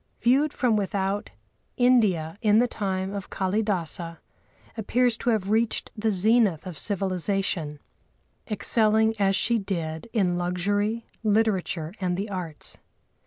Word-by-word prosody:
Viewed 275 +5 +3
from 245 -6 +1
without, 195 0 -2 0.5
India, 210 - +2
in 210 -2 +4
the 245 +2 +4
time 190 -3 -3
of 200 -1 -6
Kâlidâsa, 185 -4 -2 0.6
appeared 245 +3 +1
to - - -1
have 210 -3 0
reached 225 +1 0
the 220 +1 0
zenith 210 -3 +2
of 180 -5 -7
civilisation, 190 -5 -1 0.7
excelling 220 0 +3
as 195 -1 +3
she 235 +3 +1
did 170 -2 -4
in 180 -6 +1
luxury, 205 +6 -1 0.2
literature 200 -6 0
and 180 -1 0
the 205 +2 -4
arts. 175 -5 -6
200 Hz, 120 wpm, -25 LUFS, 180-220 Hz, 0.7 s, in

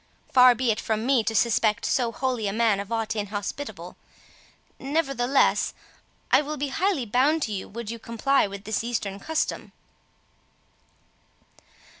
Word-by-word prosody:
Far 250 -1 +7
be 245 0 +1
it 215 - -2
from 220 0 -2
me 260 -3 +3
to 225 - -1
suspect 220 -1 +2
so 245 -3 +1
holy 250 -4 -2
a 195 - -2
man 220 -3 +2
of 200 +2 -6
aught 225 -1 -1
inhospitable; 205 +6 -5 0.8
nevertheless 275 -3 +1 0.6
I - - +6
will 300 +1 -5
be 285 0 -2
highly 345 -3 0
bound 275 +8 +2
to 220 - -3
you 195 -2 -4
would 230 0 -6
you 230 - -7
comply 230 +3 +1
with 200 0 -9
this 215 0 -2
Eastern 210 -4 -3
custom." 320 +9 -3
235 Hz, 145 wpm, -25 LUFS, 215-270 Hz, 0.8 s, Far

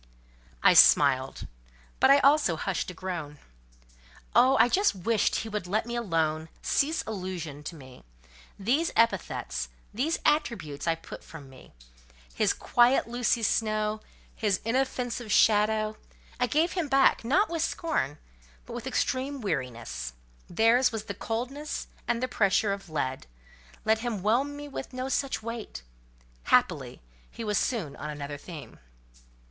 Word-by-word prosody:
I - - +7
smiled; 135 -2 +5 0.5
but - - +5
I 275 - +8
also 280 - +4
hushed 185 +4 -2
a - - -7
groan. 165 -5 -5 1.0
Oh!—I 255 +1 +5
just 390 - +2
wished 210 +4 +1
he 225 - -2
would 210 -4 -4
let 215 +4 0
me 240 0 -4
alone—cease 165 - -1
allusion 180 -8 -5
to 165 - -7
me. 130 -4 -14 0.5
These 270 +12 +1
epithets—these 235 +4 -1
attributes 180 - 0
I 165 - +3
put 165 - -11
from 140 -5 -12
me. 130 - -16 0.6
His - - +2
"quiet 245 +2 +3
Lucy 240 -1 0
Snowe," 215 0 0 0.3
his 205 -4 0
"inoffensive 245 -2 -1
shadow," 215 +1 +3 0.4
I 250 - +2
gave 315 +6 +2
him 355 -5 -2
back; 270 -3 +4
not 330 - +3
with 335 -2 -1
scorn, 320 - -1 0.5
but - - -9
with - - -6
extreme 270 +2 -1
weariness: 120 - -4 0.4
theirs 230 +7 +4
was 220 -2 -4
the 205 - -5
coldness 250 +9 -4 0.2
and 240 +1 0
the - - +1
pressure 200 -2 +2
of 195 -3 -8
lead; 130 - -3 0.6
let 220 0 +3
him 225 -5 -3
whelm 260 +7 +1
me 290 0 -7
with 270 -2 -7
no 255 +1 -3
such 270 -3 -1
weight. 230 - -6 0.6
Happily, - - +1 0.3
he 230 - -8
was 210 -2 +1
soon 200 - -2
on 150 - -6
another 145 -1 -6
theme. 150 -8 -10
220 Hz, 140 wpm, -28 LUFS, 165-255 Hz, 1.0 s, I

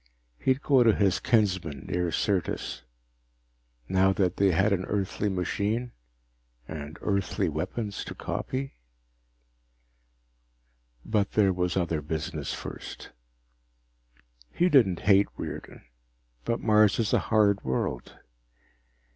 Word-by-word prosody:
He'd 130 +2 +1
go 135 -3 +4
to 115 -3 +5
his 95 -2 +2
kinsmen 95 - 0
near 90 -1 -1
Syrtis. 90 -9 -1 1.1
Now 95 +3 +3
that 90 -1 0
they 100 -1 +4
had 95 +4 +3
an 90 -1 0
Earthly 100 +1 -1
machine, 105 +6 -1 0.8
and 75 -1 -7
Earthly 100 -3 0
weapons 105 -4 -3
to - - -7
copy 135 - -4 2.3
But 105 -2 0
there 100 -3 +4
was 90 0 -1
other 85 -4 0
business 75 0 -4
first. - - -8 1.4
He 175 +1 +2
didn't 110 - +4
hate 100 0 +5
Riordan, - - -7 0.6
but 115 - -1
Mars 105 -2 +4
is 110 -3 0
a - - +5
hard 105 -2 +2
world. 65 -1 -3
100 Hz, 110 wpm, -27 LUFS, 90-110 Hz, 2.3 s, to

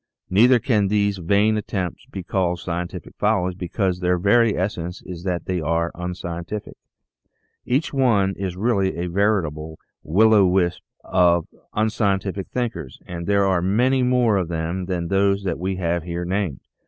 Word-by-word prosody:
Neither 120 +7 +6
can 110 -4 +1
these 100 -1 +1
vain 100 +5 +2
attempts 95 -4 -4
be 95 - -7
called 90 -1 0
scientific 85 0 -5
follies 100 -4 +1
because 90 +1 -2
their 90 0 +1
very 110 +4 +3
essence 90 -1 -3
is 90 -2 -8
that 90 -2 -2
they 90 -2 -2
are 85 +2 0
unscientific. 90 +2 -6 0.9
Each 135 +6 0
one 110 -8 +2
is 95 -2 -4
really 100 -5 +1
a 85 - -2
veritable 85 -5 -1 0.2
" - - -66
Will 110 +8 +4
o' 105 - +6
the - - +4
Wisp 90 -1 +1 0.2
" - - -39
for 85 -2 +3 0.3
unscientific 100 -3 0
thinkers, 115 - -4
and 85 -1 -6
there 100 -1 +3
are 95 -2 +2
many 125 +8 +2
more 125 -4 +3
of 90 -3 -1
them 85 +2 -3
than 90 -2 -2
those 100 0 +2
that 90 -4 -2
we 95 +2 -2
have 85 -1 -1
here 85 +1 -4
named. 90 -7 -2
95 Hz, 165 wpm, -22 LUFS, 85-105 Hz, 0.9 s, Neither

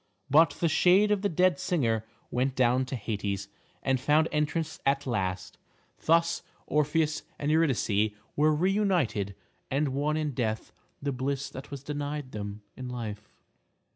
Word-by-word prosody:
But 150 0 +5
the 170 - +3
shade 180 +6 +5
of 205 -2 +2
the 200 - +1
dead 180 +1 +3
singer 115 -12 0 0.2
went 130 +1 0
down 130 0 +3
to 130 - -4
Hades, 100 -3 -3 0.3
and 130 -1 +2
found 150 +4 +3
entrance 150 +1 -1
at 140 +1 +1
last. 95 -7 -2 0.5
Thus 170 +1 +3 0.2
Orpheus 150 +1 +1 0.2
and 145 +1 -1
Eurydice 120 -9 +2 0.3
were 155 +1 +4
re 175 +6 +2
united, 170 - +1 0.3
and 140 +2 +1
won 145 +3 0
in 155 -2 -1
death 110 -4 -2 0.3
the 140 - 0
bliss 135 +2 -2
that 135 +1 -8
was 140 -2 -7
denied 145 -1 -4
them 105 0 -6
in 130 -1 -6
life. 110 -4 -6
140 Hz, 150 wpm, -29 LUFS, 120-155 Hz, 0.5 s, But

